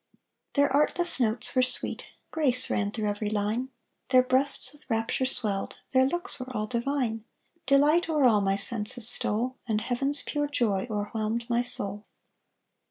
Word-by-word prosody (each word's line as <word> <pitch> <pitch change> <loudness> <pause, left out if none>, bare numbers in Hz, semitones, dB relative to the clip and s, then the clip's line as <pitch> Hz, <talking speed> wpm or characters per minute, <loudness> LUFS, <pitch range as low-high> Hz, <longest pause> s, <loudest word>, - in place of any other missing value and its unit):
Their 285 -2 +1
artless 335 +3 +3
notes 225 -2 0
were 255 - +2
sweet, 255 0 0 0.2
Grace 260 -6 +2
ran 205 -1 -1
through 215 0 -4
every 205 0 -3
line; 215 +5 -2 0.4
Their 255 -1 +5
breasts 260 0 +3
with 295 -2 -16
rapture 225 +3 -1
swelled, 210 -7 +1
Their 260 0 +3
looks 350 +4 -3
were 255 0 -7
all 215 - -2
divine: 235 -1 -3 0.4
Delight 295 +5 +3
o'er 305 -3 +1
all 220 -5 +4
My 195 0 0
senses 220 +2 +1
stole, 245 +1 +2
And 215 -2 0
heaven's 275 +5 -2
pure 290 0 -3
joy 225 -8 -1
O'erwhelmed 215 +2 -3
my 235 0 +2
soul. 205 -4 -1
245 Hz, 155 wpm, -26 LUFS, 215-275 Hz, 0.4 s, Their